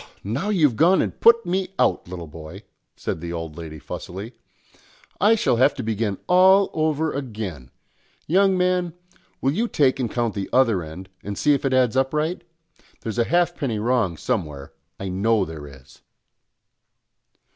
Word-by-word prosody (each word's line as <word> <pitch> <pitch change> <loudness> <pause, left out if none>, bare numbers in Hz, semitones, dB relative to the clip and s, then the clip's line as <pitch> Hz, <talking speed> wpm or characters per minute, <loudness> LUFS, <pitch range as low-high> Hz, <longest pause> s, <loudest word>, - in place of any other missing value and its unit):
"Now 130 - -2
you've 150 - +2
gone 175 +4 +5
and - - -2
put 230 0 +5
me 190 +2 -2
out, - - +1
little 90 -1 -7
boy," 80 0 -10 0.3
said 80 - -4
the 85 0 -5
old 80 -3 -5
lady 80 -2 -8
fussily. 95 - -7 0.9
"I 210 +3 +5
shall 165 - +1
have 135 +4 +4
to - - -5
begin 110 -2 -1
all 190 +2 +5
over 155 0 0
again. 105 - -6 0.6
Young 190 +3 +3
man, 180 -2 +1 0.5
will 135 - +2
you 225 +10 0
take 135 - +2
and 120 -3 -1
count 120 -3 -1
the 100 -1 -4
other 115 -8 +3
end 80 +4 -9 0.2
and 100 -1 -5
see 150 - +3
if 140 - -1
it 135 - +1
adds 130 -2 +3
up 135 +2 +1
right? 160 +4 -1 0.6
There's 115 +1 -4
a 120 - +3
halfpenny 170 -8 0
wrong 110 -6 0
somewhere; 75 - -3 0.3
I 95 - -4
know 100 +2 +1
there 80 -3 -8
is." 65 -2 -16
120 Hz, 165 wpm, -23 LUFS, -, 0.9 s, gone